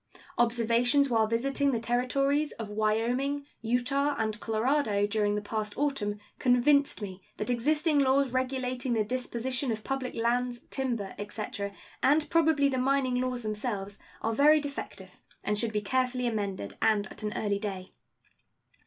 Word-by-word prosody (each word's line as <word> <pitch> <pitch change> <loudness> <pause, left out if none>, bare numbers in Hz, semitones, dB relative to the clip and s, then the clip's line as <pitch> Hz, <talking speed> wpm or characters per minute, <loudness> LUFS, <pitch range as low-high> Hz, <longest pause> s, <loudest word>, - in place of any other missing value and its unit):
Observations 240 +3 +3
while 220 -2 +3
visiting 275 +5 +1
the 235 - 0
Territories 275 +5 +1
of 225 -2 -7
Wyoming, 235 +7 0 0.2
Utah, 250 +5 +1
and 220 -1 -1
Colorado 225 -2 +1
during 205 0 +1
the 210 - -2
past 210 0 -3
autumn 270 -8 0 0.2
convinced 260 0 +3
me 190 -1 -7 0.2
that 210 - -1
existing 300 +5 +2
laws 270 -1 +3
regulating 255 -1 -1
the 220 -2 +2
disposition 255 +2 -1
of 215 -1 -4
public 270 -2 -3
lands, 240 +1 0
timber, 235 -7 -2
etc., 205 -1 -4 0.3
and 295 +3 +3
probably 315 -4 +4
the 260 -2 0
mining 260 -1 +1
laws 250 -1 -2
themselves, 210 -2 -3 0.2
are 225 - 0
very 300 +6 +6
defective 200 -10 -7 0.2
and 210 0 0
should 230 -1 0
be 210 -1 -1
carefully 250 +3 0
amended, 200 - -3
and 215 -2 +3
at - - -9
an 210 -1 -2
early 205 -2 0
day. 195 -3 -4
245 Hz, 145 wpm, -29 LUFS, 215-270 Hz, 0.3 s, very